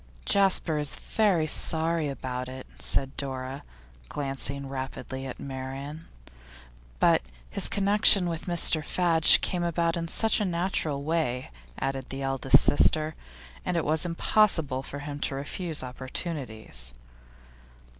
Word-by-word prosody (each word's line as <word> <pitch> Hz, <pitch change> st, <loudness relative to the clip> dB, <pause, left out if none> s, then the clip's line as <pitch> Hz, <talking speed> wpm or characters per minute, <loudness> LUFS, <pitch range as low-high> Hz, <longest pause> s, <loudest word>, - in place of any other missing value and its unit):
'Jasper 190 Hz, -5 st, +2 dB
is 150 Hz, -2 st, +1 dB
very 195 Hz, -8 st, +1 dB
sorry 160 Hz, 0 st, +3 dB
about 125 Hz, -2 st, -5 dB
it,' 130 Hz, 0 st, -8 dB
said 135 Hz, -, -1 dB
Dora, 135 Hz, 0 st, -5 dB, 0.5 s
glancing 140 Hz, 0 st, -3 dB
rapidly 135 Hz, 0 st, -6 dB
at 130 Hz, -, -8 dB
Marian. 135 Hz, +3 st, -7 dB, 0.9 s
'But -, -, +4 dB, 0.3 s
his -, -, +1 dB
connection 200 Hz, -2 st, +4 dB
with 165 Hz, 0 st, -4 dB
Mr 170 Hz, -2 st, +4 dB
Fadge 165 Hz, 0 st, +5 dB
came 180 Hz, -2 st, -2 dB
about 170 Hz, 0 st, 0 dB
in 165 Hz, -1 st, -3 dB
such 220 Hz, +5 st, +2 dB
a -, -, +1 dB
natural 170 Hz, -5 st, -1 dB
way,' 145 Hz, -, -1 dB, 0.3 s
added 135 Hz, -1 st, -3 dB
the 135 Hz, +1 st, -5 dB
eldest 135 Hz, 0 st, +4 dB
sister. 155 Hz, +1 st, +3 dB, 0.5 s
'And 180 Hz, -, -1 dB
it 165 Hz, -, -1 dB
was 155 Hz, +1 st, +1 dB
impossible 165 Hz, -5 st, +2 dB
for 140 Hz, -, -7 dB
him 145 Hz, -1 st, -6 dB
to 140 Hz, -, -2 dB
refuse 155 Hz, +3 st, -2 dB
opportunities. 125 Hz, -, -5 dB
150 Hz, 125 wpm, -27 LUFS, 135-170 Hz, 0.9 s, Fadge